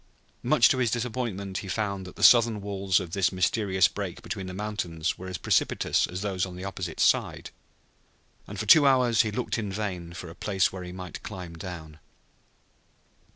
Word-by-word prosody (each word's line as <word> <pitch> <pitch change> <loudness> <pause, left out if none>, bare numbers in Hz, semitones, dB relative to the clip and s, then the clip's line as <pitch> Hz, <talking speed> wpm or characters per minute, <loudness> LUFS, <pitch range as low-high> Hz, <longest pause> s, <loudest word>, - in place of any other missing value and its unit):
Much - - +5
to 130 - +1
his 120 -2 +2
disappointment 110 -5 -3
he 100 - -8
found 100 -2 -2
that 90 - -11
the - - -5
southern 115 -3 +6
walls 100 -2 0
of 90 -4 -7
this 95 0 +1
mysterious 95 0 +2
break - - -6
between 95 -1 -5
the - - -5
mountains 90 -6 -3
were 95 - -9
as 90 -1 -4
precipitous - - +1
as 90 +2 -6
those 95 -3 -2
on 90 -2 -4
the 90 - -8
opposite 90 -4 -5
side, - - +1 1.0
and 100 -1 -7
for 110 - -2
two 145 +7 +7
hours 125 -5 +4
he 110 - -1
looked 115 +2 -2
in 105 -3 -3
vain 95 -4 -4
for 90 0 -8
a - - -10
place 95 +1 0
where 95 - -6
he 90 0 -7
might 90 -1 -8
climb 90 -5 -8
down. 80 -3 -8
95 Hz, 190 wpm, -27 LUFS, 90-105 Hz, 1.0 s, two